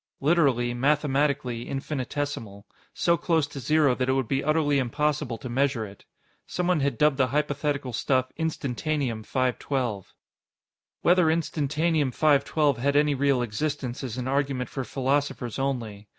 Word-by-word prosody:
Literally, 135 -6 +2
mathematically, 135 -2 0
infinitesimal 135 -6 -4 0.3
so 170 0 +2
close 160 -2 +1
to 140 -1 -8
zero 145 +1 +3
that 130 +1 -1
it - - +3
would 135 -3 0
be 135 +3 0
utterly 150 -1 +2
impossible 135 -1 -1
to 130 - -7
measure 130 -2 0
it. 100 -1 -13 0.4
Someone 180 -2 0
had 140 0 0
dubbed 150 -3 +3
the 130 -2 +3
hypothetical 145 -1 -1
stuff 130 0 0
Instantanium 145 -5 -2
512. 125 -4 -2 0.9
Whether 175 -1 +5
Instantanium 155 -2 +1
512 145 -1 +2
had 140 +3 +1
any 150 0 +4
real 140 -2 +2
existence 130 +2 -3
is 125 -2 -5
an 125 0 -3
argument 135 -2 -1
for 135 - -3
philosophers 135 -1 -1
only. 115 -7 -3
140 Hz, 135 wpm, -26 LUFS, 125-150 Hz, 0.9 s, Whether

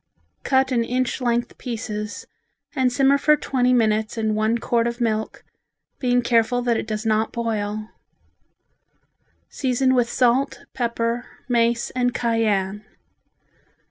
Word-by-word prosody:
Cut 265 0 +2
in 235 -2 +2
inch 255 +2 -1
length 240 0 -1
pieces 215 -3 -5 0.5
and 260 -2 +2
simmer 275 +2 +3
for 300 +2 +5
twenty 255 -4 +1
minutes 220 -2 +1
in 220 -1 0
one 215 +2 +1
quart 235 0 0
of 235 +1 -4
milk, 220 -2 -2 0.6
being 245 -1 +2
careful 235 +1 +2
that 240 -1 +2
it 220 - -3
does 215 +1 -3
not 220 0 +1
boil. 215 -2 -3 1.6
Season 260 0 +1
with 245 -2 +2
salt, 265 +2 +1
pepper, 235 -1 -2 0.2
mace 235 -1 +1
and 245 -1 0
cayenne. 210 -4 0
235 Hz, 125 wpm, -22 LUFS, 220-250 Hz, 1.6 s, for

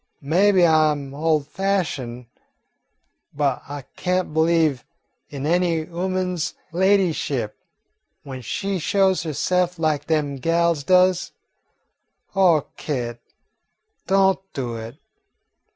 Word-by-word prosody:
"Maybe 185 +5 +4
I 155 -1 +4
'm 140 -2 -4
ol' 155 +1 +1
fashioned, 145 -7 -2 1.1
but 140 -3 0
I 145 -1 -6
can't 180 -3 -1
believe 160 -4 +2 0.5
in 140 -1 -5
any 170 0 +2
ooman's 180 -1 -2 0.2
ladyship 170 - +1 0.7
when 130 -2 -7
she 195 - -3
shows 190 +2 +2
herse'f 180 +4 0
lak 155 -3 0
dem 150 -3 0
gals 165 +1 +1
does. 185 +3 +3 1.0
Oh, 175 -6 +4
Kit, 120 -5 -4 0.9
don't 195 0 +3
do 125 -4 -4
it. 115 +2 -7
160 Hz, 100 wpm, -22 LUFS, 140-180 Hz, 1.1 s, Maybe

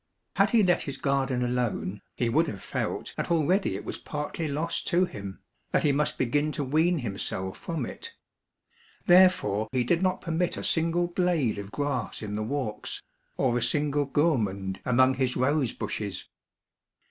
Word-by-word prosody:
Had - - +5
he 230 -3 +4
let 180 -2 +3
his 135 -2 -4
garden 135 -2 0
alone, 120 -5 -1
he 120 - 0
would 155 +8 +3
have 100 -8 -6
felt - - -3
that - - -2
already 170 +4 +2
it - - -6
was - - -5
partly 150 +2 -4
lost 155 +4 -2
to 180 +1 +3
him, 100 - -8 0.3
that - - +1
he 150 - +4
must 145 +2 0
begin 145 +5 +1
to 145 - -2
wean 160 +6 +2
himself 95 -5 -3
from 160 -7 -3
it; - - -8 0.9
therefore 175 - +5
he 130 -2 +1
did 165 +8 +1
not 185 0 +1
permit 170 +1 -1
a - - -5
single 170 +1 +2
blade 175 - 0
of 100 0 -7
grass 140 -6 -2
in 105 -1 -4
the 105 - -2
walks, 110 -2 -3 0.3
or 125 -2 +2
a 120 - +1
single 145 +2 +1
gourmand 105 - 0
among 130 +1 +5
his 130 -1 0
rose 130 0 +2
bushes. 100 -3 -4
140 Hz, 170 wpm, -27 LUFS, 120-165 Hz, 0.9 s, Had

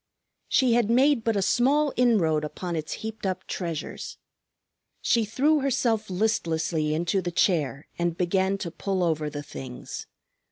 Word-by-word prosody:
She 255 -3 +4
had 235 -2 +2
made 260 +1 +4
but 225 -1 +1
a 200 - +1
small 275 +8 +3
inroad 185 -11 +3
upon 170 +3 -4
its 155 -1 -3
heaped 220 0 -6
up 185 -1 -2
treasures. 170 -4 -5 0.8
She 230 -2 +2
threw 290 +8 +2
herself 235 -6 0
listlessly 165 -6 0
into 175 +4 0
the 175 - -2
chair 155 -6 +1
and 170 -1 0
began 190 +2 +1
to 170 - -4
pull 190 +1 -1
over 155 -3 0
the 145 0 -6
things. 130 -3 -8
190 Hz, 150 wpm, -26 LUFS, 160-230 Hz, 0.8 s, She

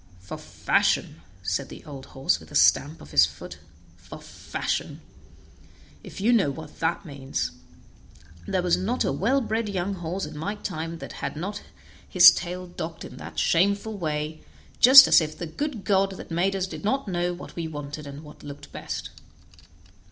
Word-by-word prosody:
"For 90 - -8
fashion!" - - 0 0.2
said - - -2
the - - -11
old 140 -3 -9
horse 135 -9 0
with 80 -1 -15
a - - -9
stamp 150 +3 +4
of 75 - -13
his 75 +1 +6
foot; 70 -1 -10 0.4
"for 90 +1 -11
fashion! - - -4 1.0
if - - -10
you 225 +5 +3
know 205 -11 +3
what 155 +2 -9
that 165 +4 -1
means; 140 -3 -4 1.0
there 185 -2 0
was 180 -1 +3
not 225 +7 -1
a - - +1
well 260 +8 +1
bred 225 -2 -2
young 195 0 -2
horse 180 +1 -4
in 150 0 -9
my 195 +8 -3
time 165 -5 -5
that - - -9
had - - -3
not 200 +6 -5 0.5
his 180 -1 +9
tail 180 +1 -4
docked 170 -2 -7
in - - -11
that - - -10
shameful 200 +5 +2
way, 155 -3 -3 0.4
just 265 +2 +11
as - - +7
if 155 0 -4
the 175 - -4
good 235 - -4
God 195 -1 +2
that - - -10
made 185 +4 +1
us 190 -1 0
did 190 - -8
not 265 +5 0
know 175 -1 -1
what 175 - -9
we 165 -1 -3
wanted 145 -1 -7
and 140 +2 -9
what 150 -1 -13
looked 145 0 -10
best." - - -6
175 Hz, 180 wpm, -25 LUFS, 150-200 Hz, 1.0 s, just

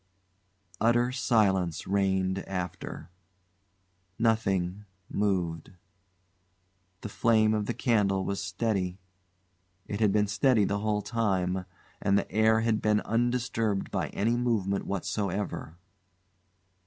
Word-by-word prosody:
Utter 120 +2 +3
silence 100 - +1
reigned 95 -1 +1
after. 90 -2 -5 1.1
Nothing 100 -4 0 0.2
moved. 90 -5 -1 1.3
The 105 - -6
flame 110 0 +3
of 105 -1 -1
the - - -2
candle 100 -6 +1
was 100 0 -2
steady. 95 -1 -1 0.9
It 100 - -4
had 105 -3 +3
been 105 +1 +3
steady 105 +2 +3
the 100 +1 -1
whole 105 0 -1
time, 95 -5 0 0.4
and 100 0 +3
the 100 - -2
air 110 +2 +3
had 115 -1 +1
been 105 0 +2
undisturbed 115 -3 0
by - - -1
any 115 +4 0
movement 110 -5 0
whatsoever. 100 -3 -3
105 Hz, 105 wpm, -28 LUFS, 95-110 Hz, 1.3 s, Utter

